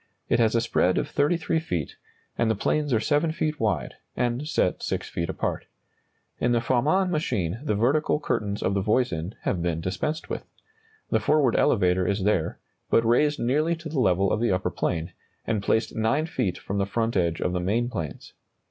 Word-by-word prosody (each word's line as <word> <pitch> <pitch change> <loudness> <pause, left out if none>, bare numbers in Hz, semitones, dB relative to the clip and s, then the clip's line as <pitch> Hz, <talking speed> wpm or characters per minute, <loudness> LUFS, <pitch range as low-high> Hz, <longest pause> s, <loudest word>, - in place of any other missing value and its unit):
It - - +3
has 115 -1 +3
a 115 - +3
spread 90 -5 +2
of - - 0
33 160 +2 +1
feet, 90 - -3 0.4
and 115 - +1
the 110 - +2
planes 150 +8 0
are 115 - +3
7 150 +7 +1
feet 155 -1 -2
wide, 110 -2 -1 0.2
and 125 +4 -1
set 90 - 0
6 - - -2
feet 85 0 -3
apart. - - -3 0.7
In 120 0 +2
the 120 - +3
Farman 150 +11 +2
machine 115 - -1
the 125 -9 0
vertical 140 +8 +2
curtains 105 -8 -2
of 95 - +1
the 100 - +1
Voisin 100 -5 0
have 90 - 0
been 85 -2 -1
dispensed 95 - -3
with. - - -4 0.7
The - - +3
forward 145 -6 +3
elevator 90 -3 +3
is 100 -1 0
there, 95 -5 +1 0.3
but 115 - +3
raised 145 +6 +3
nearly 150 +8 +1
to 165 -1 -8
the 150 -3 -1
level 95 -3 +3
of - - 0
the 120 - +2
upper 95 0 0
plane, 80 -1 -2 0.3
and 110 -3 0
placed 110 +3 0
9 115 +8 +1
feet 95 - -2
from 100 +1 -4
the 100 - 0
front 115 +2 -1
edge 85 -3 +1
of 90 - -1
the 90 - 0
main 110 +7 0
planes. 85 - -6
115 Hz, 195 wpm, -26 LUFS, 95-145 Hz, 0.7 s, It